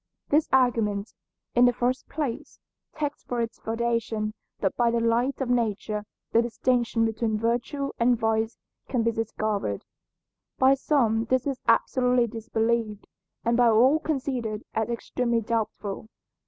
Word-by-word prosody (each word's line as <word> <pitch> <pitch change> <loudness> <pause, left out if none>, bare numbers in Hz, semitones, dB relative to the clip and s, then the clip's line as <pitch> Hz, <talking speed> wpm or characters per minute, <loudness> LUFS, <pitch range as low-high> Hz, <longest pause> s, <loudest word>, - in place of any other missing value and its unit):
This 300 +2 +3
argument, 225 -6 +2 0.4
in 245 +1 +6
the 245 - +4
first 250 +2 -1
place, 285 -6 -4 0.4
takes 295 -1 -3
for 245 - -3
its 230 0 -3
foundation 225 -2 -1 0.3
that 195 - 0
by 240 -1 +3
the 235 0 +1
light 235 +4 +1
of 265 - -1
nature 215 -3 -1 0.3
the 230 - +5
distinction 235 0 +1
between 220 -1 -1
virtue 240 +5 -1
and 240 +1 +4
vice 225 0 0 0.3
can 245 -3 +1
be 230 - +2
discovered. 215 - -2 0.7
By 260 +1 +6
some 240 -5 +1
this 255 +2 +1
is 275 -3 -2
absolutely 250 +1 +3
disbelieved, 225 -1 -1 0.4
and 235 0 +3
by 240 -1 +5
all 255 +7 +5
considered 255 -8 -2
as 220 +1 -1
extremely 235 0 -1
doubtful. 215 -2 -3
235 Hz, 140 wpm, -26 LUFS, 220-250 Hz, 0.7 s, in